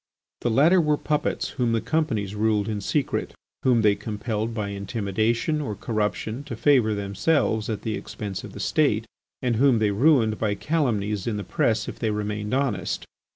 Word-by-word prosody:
The 120 - 0
latter 160 +10 +5
were 150 -2 +2
puppets 150 0 -1
whom 120 -4 0
the 115 - +2
companies 115 -10 -1
ruled 105 -1 +1
in 105 -2 -2
secret, 140 +7 -1 0.3
whom 120 -3 +3
they 105 -1 +5
compelled 105 +2 -3
by 105 -3 -3
intimidation 110 - -1
or 110 -8 -3
corruption 110 +3 -2
to - - -5
favour 125 -7 +3
themselves 110 +3 0
at 110 -2 -3
the 110 - -2
expense 100 -3 -5
of - - -9
the - - -8
State, - - +1 0.4
and 120 -3 +1
whom 130 -1 +5
they 110 -2 +2
ruined 115 -1 +3
by 105 -2 0
calumnies 105 - -1
in 110 -3 -1
the 105 - -3
press 110 +1 0
if - - -7
they 115 - 0
remained 105 0 -3
honest. 130 -5 -1
110 Hz, 175 wpm, -25 LUFS, 105-130 Hz, 0.4 s, latter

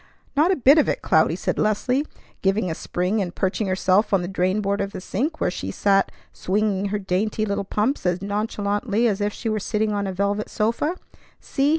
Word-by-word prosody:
"Not 305 +5 +4
a - - +3
bit 280 +2 +6
of - - +3
it, - - -2
Cloudy!" - - +3
said - - -2
Leslie, 250 +7 +1 0.3
giving 195 -2 +1
a - - -1
spring 180 +6 -1
and 180 -2 -4
perching 195 +2 -1
herself 190 +2 +2
on 180 - +1
the - - -3
drain 185 +1 0
board 200 0 0
of 200 0 -3
the - - -5
sink, 275 - -2
where 180 - +1
she 95 - -5
sat 195 - +2 0.2
swinging 200 0 0
her 205 +1 -1
dainty 205 +3 -1
little 200 -1 -1
pumps 215 +8 -1
as 180 0 +1
nonchalantly 205 +2 -1
as 205 -2 0
if 205 0 +1
she 225 - -6
were 215 -1 0
sitting 215 +1 -1
on 200 -1 -1
a - - -2
velvet 200 +3 -1
sofa. 235 +10 0 0.4
"See! 275 0 0
205 Hz, 210 wpm, -23 LUFS, 195-220 Hz, 0.4 s, bit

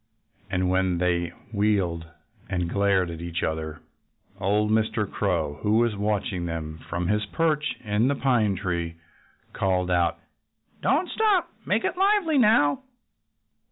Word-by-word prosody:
And 90 -1 0
when 95 -1 +1
they 85 -1 +1 0.3
wheeled 95 -6 0 0.4
and 90 -2 -1
glared 95 -1 +1
at 85 0 -7
each 85 0 -3
other 80 0 -3 0.6
old 105 +3 +1
Mr. 110 -1 +1
Crow, 85 -8 -1
who 105 +1 +2
was 115 -2 +2
watching 100 -3 -1
them 80 -1 -5
from 85 +1 -2
his 105 +1 0
perch 155 +2 0
in 105 +2 +1
the 140 - +1
pine 120 -8 +2
tree, 85 -3 -3 0.6
called 90 -1 0
out: 85 -2 +2 0.6
"Don't 315 +7 +2
stop! 420 -4 +1 0.2
Make - - +1
it - - -1
lively, 385 -6 +3
now!" 210 - +4
100 Hz, 135 wpm, -25 LUFS, 85-110 Hz, 0.6 s, now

